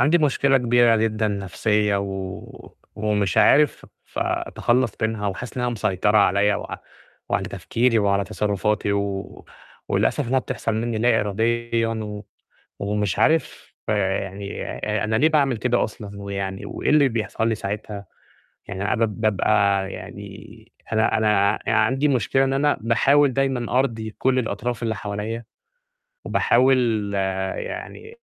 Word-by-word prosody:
عندي 160 +4 +4
مشكلة 140 -2 +3
كبيرة 120 -1 +4
جدًا 110 -1 0
نفْسيّة، 105 +1 0
و 95 -1 -7 0.2
ومش 105 -3 0
عارف 150 +1 +4 0.2
ف - - -11
أتخلّص 120 -2 0
بينها 110 -2 -1
وحاسس 110 +6 -6
إنّها 125 -1 0
مسيطرة 105 -2 +1
عليّا 100 +1 +3
وع - - -6 0.5
وعلى - - 0
تفكيري 115 -1 0
وعلى 100 -1 +1
تصرُّفاتي 105 0 -1
و 100 -1 -3 0.4
وللأسف 140 -5 0
إنّها 130 - +3
بتحصل 115 -3 -3
منّي 115 0 -2
لا 115 0 +3
إراديُا 115 +3 0
و 105 -2 -5 0.6
ومش 105 -2 -1
عارف 160 0 +1 0.2
آآ 95 -2 +1
يعني 100 +1 -6
آآ 105 0 -3
أنا 110 +1 0
ليه 150 +8 +4
باعمل 140 -6 +2
كده 120 +2 +1
أصلًا 100 -2 -7
ويعني 100 -1 -4
وإيه - - -3
اللي 150 -2 +5
بيحصل 110 -1 -2
لي 115 - +1
ساعتها، 105 0 -5 0.6
يعني 95 0 -4
أنا 105 - +1
باب 110 -1 -1
بابقى 100 -2 +2
يعني 105 +3 -11 0.2
أنا 110 0 +2
أنا 105 -1 +2
عندي 125 +6 +2
مشكلة 135 0 +2
إن 135 0 +1
أنا 145 +2 +2
باحاول 135 +5 +3
دايمًا 130 -2 0
أرضي 115 -5 -2
كلّ 130 0 +2
الأطراف 120 +1 -3
اللي 110 -1 -1
حواليّا، 105 +3 -4 0.8
وباحاول 120 -5 +2 0.5
يعني 440 +1 -7
110 Hz, 135 wpm, -23 LUFS, 100-120 Hz, 0.8 s, اللي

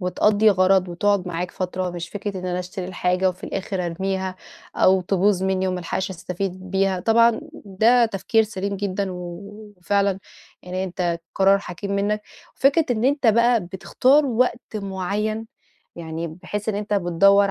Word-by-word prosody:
وتقضّي 210 +4 +3
غَرَض 185 -1 +3
وتقعُد 190 +2 +1
معاك 175 +1 -3
فترة 185 0 -3
مش 170 -1 -6
فكرة 205 -1 -5
إن 185 - -5
أنا 180 0 -1
أشتري 180 +1 -5
الحاجة 185 0 +1
وفي 185 0 -6
الآخِر 190 -2 -3
أرميها 190 +2 -3 0.4
أو 190 0 +4
تبوظ 190 +1 +1
منّي 190 0 0
وما 185 -1 -2
ألحقش 190 +2 -3
أستفيد 185 +1 -5
بيها. 190 -1 +1
طبعًا 230 +2 +4 0.2
ده 225 +5 +4
تفكير 220 +2 +1
سليم 200 -2 -4
جدًا 195 0 -2
و - - -6 0.6
وفعلًا 200 +1 +1 0.4
يعني 185 +1 -3
أنت 175 -2 -2
قرار 195 +1 +4
حكيم 195 +1 -6
منّك 210 +1 0 0.3
وفكرة 285 +4 +3
إن 230 0 0
أنت 275 -2 +2
بقى 235 +1 +4
بتختار 255 +10 +2
وقت 245 0 +1 0.2
معيّن 205 +3 -3 0.5
يعني 165 0 -5
بحيث 185 +6 -6
إن 210 - 0
أنت 210 0 -2
بتدوَّر 195 +2 +4
195 Hz, 155 wpm, -22 LUFS, 180-210 Hz, 0.6 s, أو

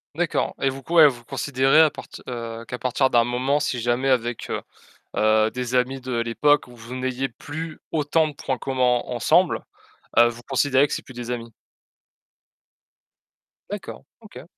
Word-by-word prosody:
D'accord 170 0 -1
et 135 - +2
vous 135 +1 -6
q 165 - -7
ouais, 160 -3 +9
vous 120 -3 -3
considérez 135 +4 +3
à 155 -2 +5
partir - - -11
heu, 115 -2 -6
qu'à 125 0 -6
partir 130 +2 +1
d'un 120 -1 +5
moment, 130 +4 0
si 130 -4 -1
jamais 120 +3 0
avec, 120 -2 0
heu - - -2 0.6
heu, 110 0 +4
des 125 0 -5
amis 130 +1 +1
de 130 -1 -4
l'époque 145 +5 +2
où 125 - -14
vous 120 +2 -9
n'ayez 130 +1 -2
plus 155 +6 -7
autant 155 +1 +2
de 145 - -8
points 130 - -3
communs 130 -1 -1 0.2
en - - -5
ensemble, - - +3 0.6
heu, 120 0 +7
vous 120 0 -8
considérez 135 +1 +3
que - - -3
c'est - - -4
plus 130 - -13
des 120 0 -7
amis? 115 -2 -5 2.2
D'accord, - - -7 0.2
OK. - - -12
130 Hz, 175 wpm, -23 LUFS, 120-140 Hz, 2.2 s, ouais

